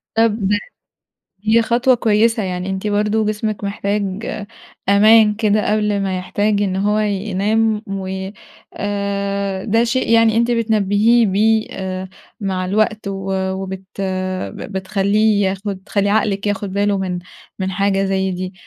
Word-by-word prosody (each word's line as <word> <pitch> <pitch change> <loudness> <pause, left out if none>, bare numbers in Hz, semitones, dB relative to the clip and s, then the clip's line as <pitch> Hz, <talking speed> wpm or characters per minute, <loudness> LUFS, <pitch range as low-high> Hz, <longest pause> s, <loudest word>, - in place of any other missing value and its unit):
طب 225 -1 +2 1.0
هي 220 +2 +4
خطوة 245 +3 +3
كويسة. 225 0 +2
يعني 180 0 -3
أنتِ 190 +2 -3
برضه 210 +1 +1
جسمِك 215 0 -2
محتاج 200 0 -2 0.6
أمان 215 +1 +6
كده 210 -1 +1
قبل 210 -1 +1
ما 190 -1 -1
يحتاج 205 +3 0
إن 190 -2 0
هو 205 +2 +1
ينام 210 +1 0
و 190 -1 -4 0.4
آآ 200 -1 -2
ده 225 +1 +2
شيء 250 +2 0
يعني 225 -1 +4
أنتِ 235 +1 +2
بتنبّهيه 220 0 +3
بيه 220 +3 +2
آآ 190 -1 -5 0.3
مع 190 -2 -1
الوقت، 215 +2 0
و 195 -1 -4 0.2
وبت 190 0 -5 0.6
ب - - -8
بتخلّيه 200 +2 +1
ياخُد 195 +1 -4
تخلّي 200 -1 0
عقلِك 205 -1 +1
ياخُد 205 -1 -2
باله 200 0 +1
من 185 -2 -2 0.4
من 190 0 -1
حاجة 195 +1 +1
زي 190 0 0
دي. 185 +1 -5
205 Hz, 135 wpm, -19 LUFS, 195-215 Hz, 1.0 s, أمان